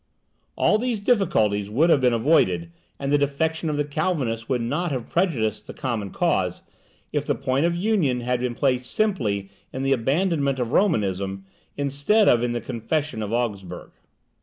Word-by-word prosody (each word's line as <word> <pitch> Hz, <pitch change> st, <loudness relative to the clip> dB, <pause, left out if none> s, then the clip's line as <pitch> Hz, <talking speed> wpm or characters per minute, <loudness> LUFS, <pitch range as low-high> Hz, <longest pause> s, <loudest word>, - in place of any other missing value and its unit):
All 215 Hz, -, +3 dB
these 240 Hz, -2 st, -1 dB
difficulties 110 Hz, -, +1 dB
would 155 Hz, +11 st, +3 dB
have 140 Hz, -, +4 dB
been 125 Hz, -1 st, +4 dB
avoided, 105 Hz, -, +2 dB, 0.3 s
and 140 Hz, 0 st, -3 dB
the 145 Hz, -, +4 dB
defection 160 Hz, +3 st, 0 dB
of 150 Hz, -, -1 dB
the 145 Hz, -, 0 dB
Calvinists 145 Hz, -7 st, -2 dB
would 125 Hz, -3 st, 0 dB
not 155 Hz, +8 st, -1 dB
have 125 Hz, -4 st, -4 dB
prejudiced 130 Hz, -, 0 dB
the -, -, -9 dB
common 120 Hz, -8 st, -3 dB
cause, -, -, 0 dB, 0.5 s
if -, -, 0 dB
the -, -, 0 dB
point 135 Hz, +4 st, +1 dB
of 170 Hz, -, -1 dB
union 175 Hz, -, +1 dB
had 125 Hz, +1 st, -1 dB
been 125 Hz, -1 st, -2 dB
placed 125 Hz, -2 st, 0 dB
simply 110 Hz, -, -1 dB, 0.2 s
in 130 Hz, -, -4 dB
the 135 Hz, 0 st, +3 dB
abandonment 140 Hz, +2 st, +1 dB
of 125 Hz, -2 st, -2 dB
Romanism, 95 Hz, -, 0 dB, 0.3 s
instead 145 Hz, +10 st, +2 dB
of 120 Hz, -, +5 dB
in 120 Hz, 0 st, 0 dB
the 120 Hz, -, -2 dB
Confession 140 Hz, +2 st, -2 dB
of 105 Hz, 0 st, -4 dB
Augsburg. 100 Hz, -7 st, -3 dB
130 Hz, 170 wpm, -24 LUFS, 115-160 Hz, 0.5 s, of